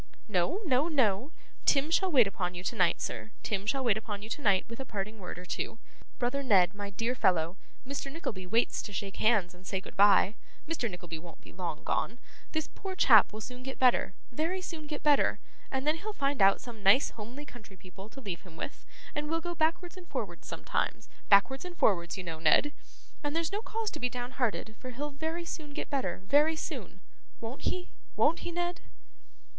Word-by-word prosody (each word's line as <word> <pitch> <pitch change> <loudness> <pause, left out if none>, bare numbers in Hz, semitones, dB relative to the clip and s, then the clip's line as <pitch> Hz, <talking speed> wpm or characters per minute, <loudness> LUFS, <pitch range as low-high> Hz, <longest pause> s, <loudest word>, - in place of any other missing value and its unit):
No, 215 - +1
no, 280 0 +3
no! 255 - +2 0.3
Tim 285 +3 +3
shall 375 +2 +3
wait 255 -7 +7
upon 180 -2 -2
you 175 - -6
tonight, 185 -4 +2
sir; 110 -2 -4
Tim 200 -1 -2
shall 270 +4 +1
wait 225 -4 +3
upon 205 -2 -5
you 215 - -8
tonight 205 -8 +2
with 230 +2 -8
a - - -2
parting 215 -2 -5
word 180 - -6
or 180 - -8
two. 225 - -3 0.4
Brother 250 +3 0
Ned, 195 -8 +5
my 205 0 -5
dear 230 +5 -1
fellow, 175 -7 +2 0.3
Mr. 275 +1 -4
Nickleby 210 - -5
waits 225 +5 +2
to 205 - -8
shake 195 0 -4
hands 210 -5 +3
and 180 +1 -14
say 190 - -1
goodbye; 200 +1 +5 0.3
Mr. 305 -8 -1
Nickleby 175 -3 -7
won't 165 -1 -12
be - - -14
long 170 -4 -4
gone; 235 - 0 0.3
this 315 -1 -1
poor 385 -1 -5
chap 220 - +7
will 215 +1 -7
soon 250 +2 -7
get 265 +1 -6
better, 250 -6 +3 0.2
very 325 +8 -1
soon 330 -4 -6
get 295 -1 -5
better; 295 -2 +4 0.3
and 265 +1 -2
then 305 +2 +3
he'll 430 +3 -5
find 280 - 0
out 195 0 +6
some 235 -3 -9
nice 200 +8 +5
homely 240 +7 -8
country 215 -8 -13
people 190 +3 -11
to 270 - -11
leave 195 -9 -5
him 170 -4 -14
with, 275 - -6 0.3
and 295 0 -2
will 330 +1 +1
go 345 +1 -4
backwards 335 +2 0
and 360 -1 -11
forwards - - -5
sometimes - - -2 0.2
backwards 210 +7 +5
and 360 -1 -8
forwards 175 -4 +2
you 185 - -4
know, 165 -2 -5
Ned. 290 - +4 0.5
And 290 +1 -1
there's 330 -1 0
no 415 - -1
cause 450 -1 -2
to - - -6
be 250 - 0
downhearted, 245 -3 -2
for 255 - -7
he'll 290 +4 -4
very 320 +4 -3
soon 300 -3 -6
get - - -4
better, 190 -9 -1
very 295 +7 +4
soon. - - -6 0.4
Won't 230 +4 -5
he, 365 0 -4 0.2
won't 330 - +3
he, 345 - -4
Ned? 350 0 -2
245 Hz, 205 wpm, -31 LUFS, 195-295 Hz, 0.5 s, wait